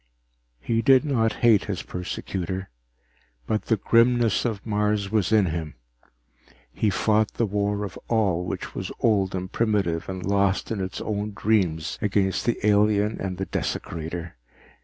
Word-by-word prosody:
He 115 Hz, -, 0 dB
did 130 Hz, +4 st, +5 dB
not 115 Hz, -6 st, +2 dB
hate 110 Hz, -4 st, +5 dB
his 100 Hz, -4 st, -4 dB
persecutor, 95 Hz, +1 st, -5 dB, 0.7 s
but 110 Hz, -, -1 dB
the 110 Hz, -, +2 dB
grimness 120 Hz, +2 st, +3 dB
of 110 Hz, -4 st, -3 dB
Mars 105 Hz, -2 st, 0 dB
was 110 Hz, -3 st, +1 dB
in 110 Hz, -3 st, +5 dB
him. 80 Hz, -2 st, -4 dB, 1.0 s
He 110 Hz, -, +1 dB
fought 105 Hz, +2 st, +1 dB
the 115 Hz, -, +1 dB
war 105 Hz, 0 st, -1 dB
of 100 Hz, -5 st, -6 dB
all 100 Hz, -7 st, +1 dB
which 90 Hz, -, -5 dB
was -, -, -5 dB
old 100 Hz, -4 st, +2 dB
and 90 Hz, 0 st, -4 dB
primitive 100 Hz, -8 st, 0 dB
and 95 Hz, -1 st, -5 dB
lost 100 Hz, +1 st, +1 dB
in 105 Hz, -3 st, -2 dB
its 95 Hz, 0 st, -4 dB
own 105 Hz, -1 st, -3 dB
dreams 90 Hz, -9 st, 0 dB
against 100 Hz, -1 st, 0 dB
the 120 Hz, -, +2 dB
alien 105 Hz, 0 st, +3 dB
and 95 Hz, -2 st, -3 dB
the 95 Hz, -, -2 dB
desecrator. 85 Hz, -1 st, -4 dB
100 Hz, 150 wpm, -25 LUFS, 95-110 Hz, 1.0 s, did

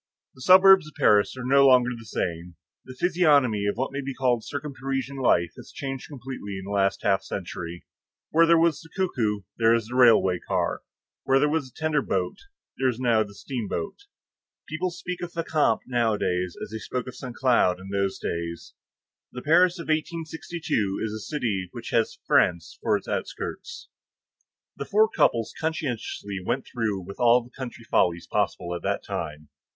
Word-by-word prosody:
The 130 Hz, -, -16 dB
suburbs 185 Hz, +1 st, +7 dB
of 155 Hz, -, -14 dB
Paris 105 Hz, +4 st, +3 dB
are 130 Hz, -, -5 dB
no 140 Hz, +1 st, +5 dB
longer 125 Hz, -1 st, +5 dB
the 115 Hz, -1 st, -11 dB
same; 85 Hz, -3 st, -4 dB, 0.3 s
the 130 Hz, -, -10 dB
physiognomy 145 Hz, -, +3 dB
of 100 Hz, -, 0 dB
what 130 Hz, -, -2 dB
may 140 Hz, +1 st, -3 dB
be 135 Hz, -1 st, -5 dB
called 125 Hz, -3 st, +1 dB
circumparisian 135 Hz, -1 st, -4 dB
life 85 Hz, -9 st, +3 dB
has -, -, -12 dB
changed 135 Hz, -2 st, -5 dB
completely 125 Hz, -7 st, -7 dB
in 95 Hz, -, -7 dB
the 100 Hz, -, -6 dB
last 95 Hz, -1 st, +1 dB
half 100 Hz, -1 st, +2 dB
century; 90 Hz, -2 st, -6 dB, 0.5 s
where 165 Hz, +1 st, +5 dB
there 170 Hz, 0 st, +6 dB
was 165 Hz, -2 st, +2 dB
the 165 Hz, -, -15 dB
cuckoo, 115 Hz, -, 0 dB, 0.2 s
there 115 Hz, 0 st, +5 dB
is 115 Hz, -2 st, -1 dB
the 120 Hz, +3 st, -7 dB
railway 110 Hz, -8 st, +5 dB
car; -, -, -1 dB, 0.4 s
where 135 Hz, -, +3 dB
there 145 Hz, +2 st, +3 dB
was 150 Hz, -4 st, -1 dB
a -, -, -18 dB
tender 155 Hz, -2 st, +1 dB
boat, 95 Hz, -7 st, -1 dB, 0.4 s
there 130 Hz, -1 st, +3 dB
is 120 Hz, -1 st, -4 dB
now 120 Hz, -3 st, +3 dB
the 100 Hz, -1 st, -5 dB
steamboat; 135 Hz, -, -5 dB, 0.6 s
people 165 Hz, +4 st, -2 dB
speak 175 Hz, +1 st, -6 dB
of 175 Hz, -1 st, -6 dB
Fécamp 155 Hz, -8 st, +1 dB
nowadays 105 Hz, -7 st, 0 dB
as -, -, -7 dB
they 110 Hz, -, -5 dB
spoke 125 Hz, +2 st, -4 dB
of 125 Hz, -, -6 dB
Saint 125 Hz, -1 st, -8 dB
Cloud 120 Hz, -9 st, +3 dB
in 95 Hz, +1 st, -10 dB
those 100 Hz, -1 st, -1 dB
days. 85 Hz, 0 st, -5 dB, 0.6 s
The 125 Hz, -, -8 dB
Paris 175 Hz, +4 st, +4 dB
of 170 Hz, -, -6 dB
1862 160 Hz, -, -2 dB
is 110 Hz, -1 st, -3 dB
a 110 Hz, -, -5 dB
city 105 Hz, -, -2 dB
which 120 Hz, -1 st, -7 dB
has 115 Hz, -1 st, +1 dB
France 85 Hz, -2 st, +2 dB
for 105 Hz, -, +2 dB
its -, -, -12 dB
outskirts. 475 Hz, 0 st, -5 dB, 0.9 s
The -, -, -5 dB
four 215 Hz, +1 st, +4 dB
couples 115 Hz, -, +1 dB
conscientiously 125 Hz, -10 st, -3 dB
went 120 Hz, +7 st, -1 dB
through 110 Hz, -5 st, -2 dB
with 100 Hz, +1 st, -10 dB
all 120 Hz, 0 st, +5 dB
the 120 Hz, -, -17 dB
country 125 Hz, -3 st, -8 dB
follies 85 Hz, -6 st, +1 dB
possible 90 Hz, -3 st, -1 dB
at 85 Hz, -, -4 dB
that -, -, -2 dB
time. 75 Hz, -2 st, -5 dB
125 Hz, 180 wpm, -25 LUFS, 100-150 Hz, 0.9 s, suburbs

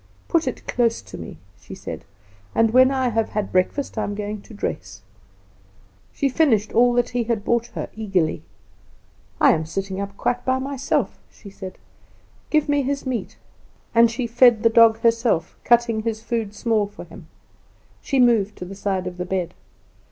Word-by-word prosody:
"Put 330 Hz, -4 st, +1 dB
it 255 Hz, -, -5 dB
close 235 Hz, -2 st, +1 dB
to -, -, -11 dB
me," 85 Hz, -3 st, -8 dB, 0.2 s
she -, -, -10 dB
said, -, -, -8 dB, 0.5 s
"and 225 Hz, -1 st, +3 dB
when 255 Hz, +2 st, +6 dB
I 260 Hz, -2 st, 0 dB
have 225 Hz, -1 st, 0 dB
had 210 Hz, -2 st, -3 dB
breakfast 220 Hz, +7 st, 0 dB
I -, -, 0 dB
am 205 Hz, -, -3 dB
going 210 Hz, 0 st, -5 dB
to -, -, -17 dB
dress." -, -, -5 dB, 1.1 s
She 280 Hz, -, 0 dB
finished 250 Hz, -7 st, +2 dB
all 245 Hz, +1 st, +4 dB
he 245 Hz, 0 st, -1 dB
had 225 Hz, -3 st, -1 dB
brought 235 Hz, 0 st, +1 dB
her -, -, -3 dB
eagerly. 195 Hz, -7 st, 0 dB, 1.0 s
"I -, -, +6 dB
am 155 Hz, 0 st, -1 dB
sitting 195 Hz, +2 st, -4 dB
up 200 Hz, 0 st, -6 dB
quite 245 Hz, 0 st, -1 dB
by 260 Hz, 0 st, +1 dB
myself," 270 Hz, 0 st, -2 dB
she 200 Hz, -, -14 dB
said. 190 Hz, -1 st, -9 dB, 0.7 s
"Give 305 Hz, -1 st, +2 dB
me 290 Hz, -1 st, +2 dB
his 275 Hz, +1 st, -2 dB
meat;" 255 Hz, -3 st, -4 dB, 0.6 s
and 230 Hz, 0 st, +6 dB
she 240 Hz, +2 st, -3 dB
fed 240 Hz, -1 st, +4 dB
the 230 Hz, -, +5 dB
dog 225 Hz, -1 st, +6 dB
herself, 230 Hz, -7 st, +1 dB
cutting 235 Hz, -2 st, +3 dB
his 220 Hz, -1 st, -3 dB
food 225 Hz, -3 st, -3 dB
small 215 Hz, -1 st, +1 dB
for 205 Hz, -, -11 dB
him. -, -, -13 dB, 0.7 s
She 275 Hz, -, 0 dB
moved 225 Hz, -5 st, +3 dB
to 180 Hz, -, -7 dB
the 190 Hz, -, -8 dB
side 195 Hz, -2 st, -2 dB
of 180 Hz, -1 st, -6 dB
the 180 Hz, -, -3 dB
bed. 180 Hz, -2 st, -2 dB
225 Hz, 175 wpm, -22 LUFS, 200-245 Hz, 1.1 s, when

